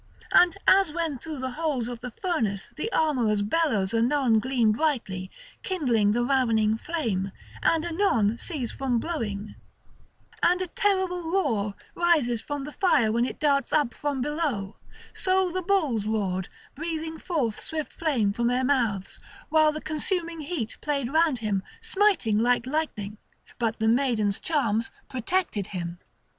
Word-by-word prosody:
And 355 0 +5
as 385 -4 +5
when 320 -4 -2
through 315 +1 -6
the 260 0 -3
holes 290 -5 -1
of 245 -1 -6
the 250 +1 -6
furnace 225 - -2
the 430 +9 -3
armourers' 240 -10 +2
bellows 215 -6 +1
anon 235 0 +3
gleam 245 -2 +2
brightly, 215 -8 -1 0.3
kindling 245 - +1
the 240 +3 +1
ravening 230 -5 +2
flame, 220 - -2 0.3
and 330 0 +2
anon 240 - +1
cease 280 -10 -4
from 260 -3 -1
blowing, 215 -9 -3 0.9
and 360 +1 +4
a 370 - -1
terrible 365 -2 0
roar 225 - 0 0.2
rises 300 -10 +2
from 290 -1 -4
the 295 - -6
fire 235 - +3
when 235 +2 +2
it - - -5
darts 280 -2 +2
up 290 -6 +2
from 285 -3 -2
below; 280 -10 -2 0.4
so 375 -1 +1
the 370 +2 -2
bulls 310 - +1
roared, 190 -4 -1 0.2
breathing 320 +1 -4
forth 265 - -1
swift 310 -2 -4
flame 250 -11 +1
from 235 +2 0
their 250 +1 +1
mouths, 230 -8 0 0.3
while 310 -1 +5
the 305 - -5
consuming 330 +2 -2
heat 285 -7 -4
played 280 -3 -1
round 320 -4 +3
him, 200 -2 +1 0.2
smiting 410 - +2
like 245 +1 +2
lightning; 235 -8 -3 0.4
but 230 -1 -1
the 220 - +1
maiden's 225 -5 +2
charms 230 -8 0 0.2
protected 255 - -1
him. 175 -2 -5
265 Hz, 150 wpm, -26 LUFS, 220-320 Hz, 0.9 s, And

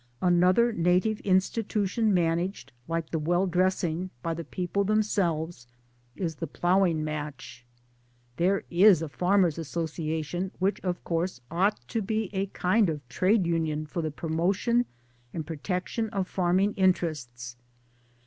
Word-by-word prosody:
Another 180 +6 +4
native 180 +4 +2
institution 205 +2 +1
managed, 170 -2 0 0.2
like 165 -1 -3
the 160 - 0
well 175 +5 +1
dressing, 180 -1 0
by 165 - -1
the 165 +1 -5
people 180 +4 -2
themselves 175 - 0 0.5
is 170 -4 -2
the 165 - -4
Ploughing 175 0 +2
Match. 150 -5 -6 0.7
There 190 +3 +2
is 180 -1 +6
a 160 - -4
Farmers' 180 +1 +2
Association 160 +2 -3
which 195 +3 0
of 180 -2 -3
course 170 -3 -2
ought 190 +5 +1
to 225 - -1
be 215 0 -2
a 195 0 -1
kind 195 +1 +2
of 145 -5 -5
Trade 185 - +2
union 160 -2 -1
for 160 +3 -4
the 160 - -2
promotion 185 +10 0 0.5
and 160 -2 -3
protection 180 +7 -3
of 195 -4 -2
farming! 185 +3 +1
interests. 150 -10 0
175 Hz, 130 wpm, -27 LUFS, 160-195 Hz, 0.7 s, is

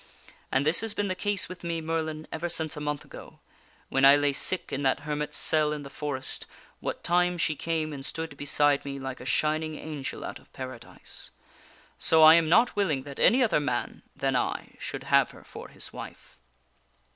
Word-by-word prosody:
And 135 +2 +2
this 155 +5 +3
has 225 -1 -3
been 205 -1 -1
the - - +1
case 205 +1 -1
with 185 -1 -10
me, 170 -1 -2
Merlin, 160 -1 -3
ever 170 +2 -3
since 160 -2 -1
a - - -5
month 150 -1 -3
ago, - - -12 0.5
when 135 - +1
I 140 +1 +9
lay 145 -1 +2
sick 185 +6 0
in 135 - -1
that 135 0 +1
hermit's 150 0 -3
cell 155 -1 +2
in 150 -1 -4
the 140 - -10
forest, 140 -2 -3 0.3
what - - -4
time 180 +1 +2
she 155 -2 +1
came 160 -1 -2
and 135 -1 -7
stood 160 +1 -4
beside 145 0 +2
me 140 -1 -5
like 135 -1 -5
a - - -9
shining 155 +2 0
angel 150 -3 -6
out - - -6
of - - -24
Paradise. - - -9 0.7
So 160 -1 +5
I 155 0 +11
am 165 -1 +4
not 230 +8 +5
willing 160 -10 +1
that 140 -1 -9
any 255 +2 +5
other 210 -10 +3
man 125 -4 -2
than 135 -1 0
I 125 - -1
should - - -5
have - - +4
her - - -15
for - - -10
his - - -8
wife. - - -10
155 Hz, 200 wpm, -28 LUFS, 140-165 Hz, 0.7 s, I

